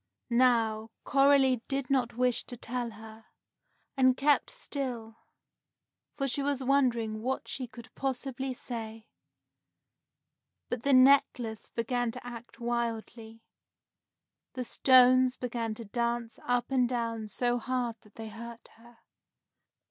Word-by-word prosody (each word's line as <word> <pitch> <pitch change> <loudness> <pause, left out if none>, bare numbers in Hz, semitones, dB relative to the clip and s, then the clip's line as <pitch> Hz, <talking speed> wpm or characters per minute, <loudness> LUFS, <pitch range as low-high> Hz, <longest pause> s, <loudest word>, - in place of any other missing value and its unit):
Now, 230 -3 +3
Coralie 275 -2 +4
did 275 -1 -2
not 245 -4 +1
wish 250 -1 +1
to 245 - -7
tell 240 +1 -4
her, 220 0 -12 0.7
and 260 -1 +4
kept 290 +1 +3
still, 250 - -5 1.0
for 275 - 0
she 275 +2 -1
was 275 -1 -1
wondering 240 -5 +1
what 260 +3 -2
she 255 -2 -4
could 235 0 -13
possibly 265 0 -3
say; 225 -3 -6 1.6
but 245 -1 -2
the 280 +2 +2
necklace 255 -4 +4
began 240 +1 -1
to 250 0 -9
act 240 0 -10
wildly. 230 -1 -4 1.1
The 255 - -3
stones 255 0 +5
began 235 -3 -3
to 230 - -8
dance 235 +1 -2
up 245 +1 0
and 250 -2 +2
down 230 -3 -2
so 245 +4 0
hard 245 -2 -2
that 210 - -22
they 225 -1 -7
hurt 235 +1 -10
her. 235 +1 -18
245 Hz, 125 wpm, -30 LUFS, 230-255 Hz, 1.6 s, stones